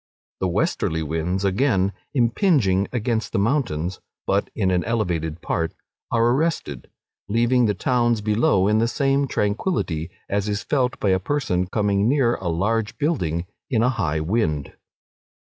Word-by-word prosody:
The 95 - 0
westerly 80 -2 0
winds, 80 +5 -2
again, 100 -1 +2 0.2
impinging 120 - +2
against 115 -2 -1
the - - +1
mountains, 100 - 0 0.3
(but 100 +1 +1
in 95 -4 +1
an 90 -1 +1
elevated 85 -8 -2
part,) 80 -1 -1 0.4
are 115 0 +3
arrested, 135 - -1 0.4
leaving 120 +2 +3
the 105 - 0
towns 120 0 +1
below 105 -2 +2
in 105 +1 +3
the 115 - +2
same 135 +2 +1
tranquillity 100 - -1 0.2
as 100 +1 -1
is 105 0 -2
felt 130 -3 0
by 100 - +1
a 95 0 +3
person 95 -6 -1
coming 100 +1 +1
near 130 -4 +3
a 95 - -4
large 105 +6 0
building 90 - -1 0.2
in 115 -3 +2
a 125 - +4
high 85 - -1
wind. 80 -5 -1
105 Hz, 145 wpm, -23 LUFS, 90-120 Hz, 0.4 s, a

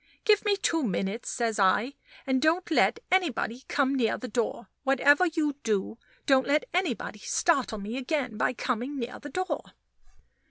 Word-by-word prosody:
"Give 425 -1 +4
me 410 -2 +2
two 330 -4 +1
minutes," 195 - -2
says 230 -3 -1
I, 205 +7 +3 0.3
"and 260 -1 +1
don't 330 +3 +1
let 385 - +3
anybody 275 -8 0
come 275 -2 +1
near 245 -5 +1
the 255 - -6
door 235 +1 -2 0.2
whatever 285 +5 +4
you 310 -4 -1
do, 215 +1 -1 0.3
don't 265 -1 +3
let 295 +2 +2
anybody 325 - -1
startle 265 -1 +1
me 210 +5 -5
again 265 -3 -2
by 220 - 0
coming 250 +3 -3
near 245 -1 -5
the 290 - -8
door." 370 +2 -2
265 Hz, 160 wpm, -28 LUFS, 230-315 Hz, 0.3 s, Give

